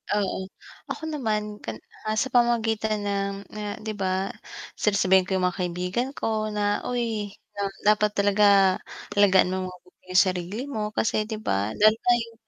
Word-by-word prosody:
Oo. 190 -2 -1 0.4
Ako - - -5
naman 215 -6 -2
kan 115 - -6 0.3
ah, 215 - 0
sa 265 +5 0
pamamagitan 225 -3 +2
ng 200 -1 -1 0.2
na 210 -1 -5
'di 220 - -3
ba 190 0 -1 0.5
sasabihin 190 -3 +3
ko 190 - 0
yung 185 - 0
mga 180 +1 -4
kaibigan 180 +9 -2
ko 215 -1 -1
na, 205 -1 0
uy 225 -5 -2 0.5
dapat 210 0 +3
talaga 200 -2 +5 0.4
alagaan 190 -2 +5
mo 190 - -1
mabuti 180 0 -15
yung 185 - +7
sarili 185 +6 -3
mo 215 -4 -3
kasi 215 -1 +1
'di 220 - -3
ba. 100 +3 -1
Lalo 215 +1 +5
na 245 - +2
yung 230 0 -13
205 Hz, 160 wpm, -25 LUFS, 190-215 Hz, 0.5 s, yung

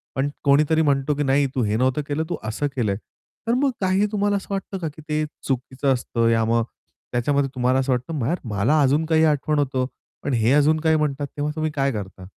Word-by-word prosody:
पण 135 +2 0
कोणीतरी 150 +3 +4
म्हणतो, 140 -1 +2
की 145 - 0
"नाही, 140 +1 +2
तू 130 - +1
हे 105 0 0
नव्हतं 130 +4 +1
केलं, 150 +2 -1
तू - - -2
असं 110 +7 -1
केलंय." 105 -6 0 0.5
तर 235 - +2
मग 270 +1 +2
काही 190 +2 +2
तुम्हाला 205 -1 +1
असं 195 - -8
वाटतं 195 0 -4
का, 165 - -3
की 155 +2 -13
ते 155 0 +1 0.2
चुकीचं 135 +1 0
असतं 115 -2 0
या 115 -1 +3
मग 115 0 +2 0.5
त्याच्यामध्ये 135 +3 +1
तुम्हाला 130 +1 +2
असं 135 0 0
वाटतं 125 +6 -1
मार 140 +9 0 0.2
मला 140 +10 +3
अजून 145 +4 +3
काही 160 0 +3
आठवण 150 0 +1
होतं 130 -2 0 0.4
पण 140 - -1
हे 115 +1 +2
अजून 150 +2 +4
काही 160 -1 +3
म्हणतात 145 -2 -1
तेव्हा 150 +1 -1
तुम्ही 155 -1 -1
काय 140 -1 +1
करता? 95 -4 -7
140 Hz, 215 wpm, -23 LUFS, 125-155 Hz, 0.5 s, कोणीतरी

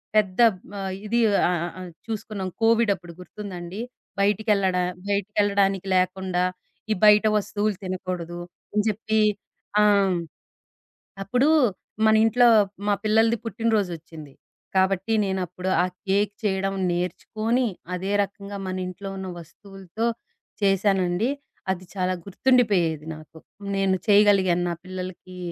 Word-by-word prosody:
పెద్ద 200 -2 +2 0.4
ఆహ్, 190 -1 -3
ఇది 235 +3 +1 0.3
ఆహ్, 180 - +1
ఆహ్, - - -7
ఆహ్, 180 -1 -8 0.2
చూసుకున్నాం. 215 -3 -4
కోవిడప్పుడు 225 -6 +2
గుర్తుందాండి, 185 0 -7 0.4
బయటికెళ్లడ 200 -2 +2 0.3
బయటికెళ్ళడానికి 200 -1 +1
లేకుండా, 185 0 +1 0.5
ఈ - - +5
బయట 210 +1 +7
వస్తువులు 210 0 -1
తినకూడదు. 180 -2 -4 0.3
అని 210 0 +1
జెప్పి 220 +1 0 0.6
ఆ! - - +5 1.4
అప్పుడూ 250 +8 +2 0.6
మన 220 - +5
ఇంట్లో 240 +2 +5 0.4
మా 205 - +4
పిల్లలది 225 +2 +3
పుట్టినరోజొచ్చింది. 180 - -2 0.4
కాబట్టి, 190 +3 +2
నేనప్పుడు 185 -1 -3
ఆ - - +2 0.2
కేక్ 200 +2 +1
చేయడం 195 -1 0 0.2
నేర్చుకోని, 215 +8 -1 0.3
అదే 185 +2 -3
రకంగా 200 0 -8
మన 185 - -3
ఇంట్లో 195 +2 -7
ఉన్న 190 0 -5
వస్తువులతో 195 +4 -7 0.6
చేసానండి. 195 +1 +2 0.4
అది 185 0 -10
చాలా 185 -1 0
గుర్తుండిపోయేది. 195 - +2
నాకు, 155 +1 -14 0.4
నేను 195 -1 +2
చేయగలిగాను. 200 -4 +4
నా 170 - -2
పిల్లలకి 185 0 -7
195 Hz, 110 wpm, -24 LUFS, 185-210 Hz, 1.4 s, బయట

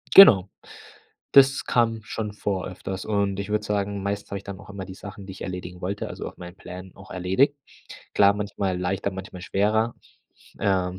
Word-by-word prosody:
Genau, 100 - +10 0.9
das 135 0 +6
kam 115 -2 +2
schon 105 -1 -4
vor 100 -2 -2
öfters 95 +1 -5
und 100 -2 0
ich 100 - -4
würde 105 0 0
sagen, 100 -1 -1
meistens 100 +1 -3
habe 100 - -2
ich 100 - -14
dann 100 -1 -7
auch - - -13
immer 100 -2 -6
die 95 - -9
Sachen, 100 0 -9
die 95 - -7
ich - - -12
erledigen 90 -1 -6
wollte, 100 +3 -3
also - - -5
auf - - -14
meinen 90 0 -9
Plänen 90 0 -9
auch 95 - -14
erledigt. 95 +11 +2 0.6
Klar, 100 0 +5
manchmal 100 -2 -2
leichter, 95 +2 -1
manchmal 95 -1 -8
schwerer. 110 +5 +1 0.7
Ähm, 95 -2 +1
100 Hz, 185 wpm, -25 LUFS, 95-105 Hz, 0.9 s, Genau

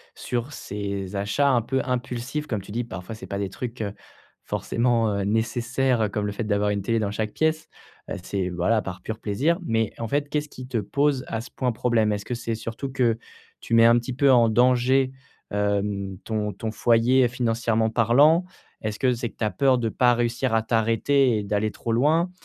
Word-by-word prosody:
sur 120 +3 -3
ces 100 -5 -5
achats 100 +9 +1
un 120 -3 +3
peu 130 +4 -1
impulsifs? 125 +3 -3
Comme 105 -4 -2
tu 100 - -12
dis 120 +2 -1
parfois, 95 -2 -7
c'est 110 - -9
pas 100 - -4
des 100 -1 -2
trucs, 120 +2 -6
heu, 100 -1 -3 0.5
forcément, 115 -2 +1
heu, 100 - -1
nécessaires, 120 +3 0
heu, 105 - +1
comme 105 0 -2
le 105 - -2
fait 105 +3 -4
d'avoir 105 -1 +1
une 100 -1 -1
télé 115 +3 0
dans 105 -2 -1
chaque 105 0 -3
pièce, 160 0 0 0.4
heu, - - -3
c'est 95 -2 -2
voilà, 90 +6 +1
par 90 -1 -7
pur 110 0 -5
plaisir, 140 - 0
mais 115 -7 0
en 115 - -3
fait, 145 +4 0
qu'est-ce 150 0 -2
qui 130 - -9
te 120 -3 -1
pose 140 +5 0
à 115 - -3
ce 115 - -9
point 125 -2 -1
problème? 110 -2 +1
Est-ce 105 0 -3
que 125 - -4
c'est 115 -1 -3
surtout 115 +5 -5
que 120 -3 +1 0.4
tu 115 - -1
mets 115 0 +7
un 120 +1 +6
petit 120 +2 -5
peu 140 +1 +4
en 120 -3 +5
danger, 130 +3 +3 0.4
hem, 100 -1 -1
ton 105 -2 -2
ton 110 +3 -5
foyer 120 +3 +3
financièrement 115 -2 0
parlant? 140 +10 +5 0.4
Est-ce 105 -1 -3
que 130 -2 +2
c'est 120 -1 -3
que - - -23
tu - - -5
as 105 - +1
peur 130 +7 +3
de 115 -2 -1
pas 125 +2 +3
réussir 120 +1 0
à 115 - +3
t'arrêter 115 +3 +2
et 105 - -2
d'aller 105 +1 0
trop 115 - -5
loin? 155 +9 +2
115 Hz, 210 wpm, -24 LUFS, 105-125 Hz, 0.5 s, mets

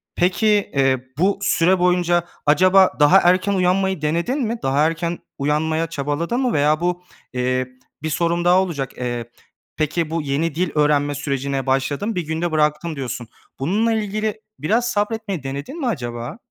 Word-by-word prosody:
peki, 185 +5 +1 0.3
eee, 135 -2 +2
bu 195 +5 +2
süre 185 -2 +3
boyunca 175 -1 +2 0.2
acaba 185 +5 +5
daha 150 +6 +7
erken 185 +3 +3
uyanmayı 190 -1 +1
denedin 170 - 0
mi? 230 -1 -1
Daha 140 +3 +2
erken 170 +1 -3 0.2
uyanmaya 155 +3 0
çabaladın 155 - -2
mı 250 -3 +1
veya 150 +1 +2
bu, 180 0 -1 0.3
eee, 130 0 0 0.4
bir 160 - -1
sorum 170 +2 0
daha 180 +1 +5
olacak. 150 -8 -4
Eee, 120 -2 -4 0.5
peki, 155 +1 -1
bu 165 +1 -1
yeni 150 +2 -1
dil 180 +1 0
öğrenme 145 -1 +2
sürecine 140 -1 -2
başladım 140 +10 -1
1 180 - 0
günde 160 +2 -2
bıraktım, 155 +1 0
diyorsun. 125 -3 -5 0.3
Bununla 210 +11 +1
ilgili 215 0 -2 0.2
biraz 220 - +1
sabretmeyi 205 - -2
denedin 140 - -6
mi 275 - -1
acaba? 120 - -4
165 Hz, 155 wpm, -21 LUFS, 145-190 Hz, 0.5 s, daha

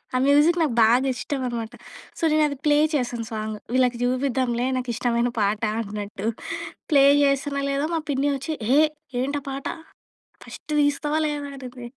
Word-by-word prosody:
ఆ - - +4
మ్యూజిక్ 295 +5 +5
నాకు 295 -7 +1
బాగా 240 +4 +5
ఇష్టం 260 +4 -3
అనమాట. 230 -1 -4 0.5
సో, - - -8
నేను 310 0 +4
అది 285 -2 -5
ప్లే 295 0 +4 0.2
చేశాను 240 -4 -1
సాంగ్ 215 0 -3 0.2
వీళ్ళకి 250 -2 +2
చూపిద్దాంలే 255 -1 0
నాకు 250 -1 -4
ఇష్టమైన 240 0 0
పాట 205 +1 +1 0.2
అన్నట్టు. 205 0 -5 0.6
ప్లే 280 -2 +6 0.2
జేశానో 280 0 +1
లేదో 280 +2 0
మా 325 - 0
పిన్ని 275 +1 +1
వచ్చి, 310 +4 -4 0.2
"హే! 285 +3 +6 0.4
ఏంట 280 +3 -1
పాట 270 0 -6 0.8
ఫస్ట్ - - -11 0.2
తీస్తావా 295 +2 0
లేదా" 290 -1 -3
అనింది. 250 -2 -9
260 Hz, 155 wpm, -24 LUFS, 235-285 Hz, 0.8 s, ప్లే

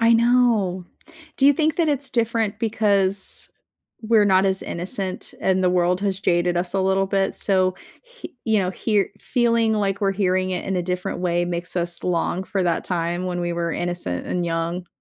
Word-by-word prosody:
I 230 0 +5
know. 230 -6 +3 0.5
Do 275 - +4
you 285 - +7
think 310 +2 0
that 335 -2 +2
it's 285 -2 -1
different 230 -3 0
because 200 -3 0 0.5
we're 220 -1 +4
not 190 -1 +4
as 190 0 0
innocent, 185 +2 -4
and 185 0 +1
the 180 - +4
world 180 0 +2
has 195 -1 -1
jaded 175 -1 +1
us 175 +2 -2
a 195 - +2
little 190 +1 +2
bit? 195 0 0
So, 185 -2 +1 0.3
he - - -12
you 220 -1 +2
know, 185 -2 0
hear 205 +1 0
feeling 230 -3 +1
like 200 -2 -1
we're 195 -1 +2
hearing 185 -1 0
it 180 - -3
in 190 - -2
a 180 - 0
different 180 0 -3
way 175 -1 +1
makes 175 +1 -5
us 170 -1 -1
long 180 +1 -1
for 195 -1 -1
that 170 -2 0
time 175 0 -2
when 175 -1 -2
we 175 0 -2
were 170 -1 -2
innocent 175 - -3
and 175 -1 -1
young. 170 +1 -2
190 Hz, 190 wpm, -22 LUFS, 175-215 Hz, 0.5 s, you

